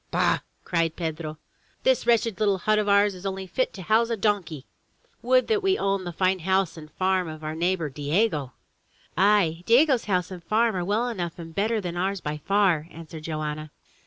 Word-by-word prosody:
"Bah!'' -, -, +2 dB, 0.2 s
cried 165 Hz, -2 st, 0 dB
Pedro. 160 Hz, -2 st, -4 dB, 0.5 s
"This -, -, +2 dB
wretched 230 Hz, -3 st, +2 dB
little 205 Hz, -2 st, +2 dB
hut 215 Hz, +4 st, +2 dB
of 210 Hz, -1 st, 0 dB
ours 200 Hz, 0 st, +4 dB
is 180 Hz, 0 st, -11 dB
only 190 Hz, -1 st, -3 dB
fit 255 Hz, +7 st, -1 dB
to 190 Hz, -, -8 dB
house 225 Hz, +5 st, +3 dB
a 230 Hz, -, -1 dB
donkey! 190 Hz, -9 st, -1 dB, 0.6 s
Would 255 Hz, +1 st, +3 dB
that 430 Hz, -2 st, +1 dB
we 385 Hz, 0 st, +2 dB
owned 195 Hz, -2 st, -1 dB
the -, -, -3 dB
fine 185 Hz, +2 st, +1 dB
house 190 Hz, 0 st, +1 dB
and 155 Hz, -2 st, -11 dB
farm 185 Hz, -1 st, +1 dB
of 155 Hz, 0 st, -8 dB
our 155 Hz, 0 st, -3 dB
neighbor, 170 Hz, 0 st, 0 dB
Diego!" 145 Hz, -, -1 dB, 0.6 s
"Aye! 190 Hz, -4 st, +3 dB
Diego's 260 Hz, +1 st, +4 dB
house 185 Hz, -2 st, 0 dB
and 180 Hz, -2 st, -8 dB
farm 220 Hz, +4 st, +2 dB
are 180 Hz, -, -1 dB
well 210 Hz, +6 st, 0 dB
enough 175 Hz, -8 st, -4 dB
and 165 Hz, -1 st, -9 dB
better 215 Hz, +5 st, 0 dB
than 175 Hz, -3 st, -5 dB
ours 195 Hz, +2 st, -1 dB
by 150 Hz, -2 st, -4 dB
far," 175 Hz, -1 st, +2 dB
answered 165 Hz, -1 st, -10 dB
Joanna. 155 Hz, -1 st, -4 dB
185 Hz, 190 wpm, -25 LUFS, 165-210 Hz, 0.6 s, ours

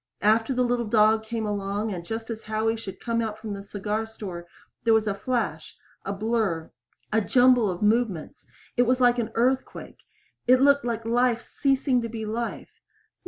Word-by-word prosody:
After 225 Hz, +4 st, +3 dB
the 250 Hz, -1 st, +1 dB
little 240 Hz, -2 st, 0 dB
dog 215 Hz, 0 st, +4 dB
came 225 Hz, 0 st, -3 dB
along, 205 Hz, +1 st, -2 dB
and 175 Hz, -2 st, -6 dB
just 225 Hz, +5 st, -5 dB
as 225 Hz, -1 st, -5 dB
Howie 220 Hz, +1 st, 0 dB
should 215 Hz, -4 st, -8 dB
come 230 Hz, -1 st, -1 dB
out 220 Hz, -2 st, -3 dB
from 215 Hz, -1 st, -6 dB
the 200 Hz, 0 st, -7 dB
cigar 210 Hz, +2 st, -3 dB
store, 185 Hz, -6 st, -8 dB, 0.4 s
there 225 Hz, -1 st, +4 dB
was 220 Hz, -1 st, +2 dB
a 205 Hz, -, 0 dB
flash 200 Hz, -7 st, -3 dB, 0.3 s
a 195 Hz, -, -3 dB
blur 200 Hz, -5 st, -1 dB, 0.4 s
a 220 Hz, -, +4 dB
jumble 245 Hz, -1 st, +4 dB
of 180 Hz, +2 st, -3 dB
movements. 210 Hz, -6 st, 0 dB, 0.3 s
It 245 Hz, -1 st, +3 dB
was 255 Hz, +1 st, +2 dB
like 245 Hz, -1 st, +4 dB
an 230 Hz, -1 st, -1 dB
earthquake 255 Hz, +3 st, -1 dB, 0.5 s
it 255 Hz, +1 st, +6 dB
looked 280 Hz, 0 st, +4 dB
like 230 Hz, -2 st, -2 dB
life 240 Hz, 0 st, +2 dB
ceasing 270 Hz, -2 st, +1 dB
to 230 Hz, -, -4 dB
be 220 Hz, -1 st, -5 dB
life. 230 Hz, +2 st, -5 dB
225 Hz, 180 wpm, -25 LUFS, 210-240 Hz, 0.5 s, it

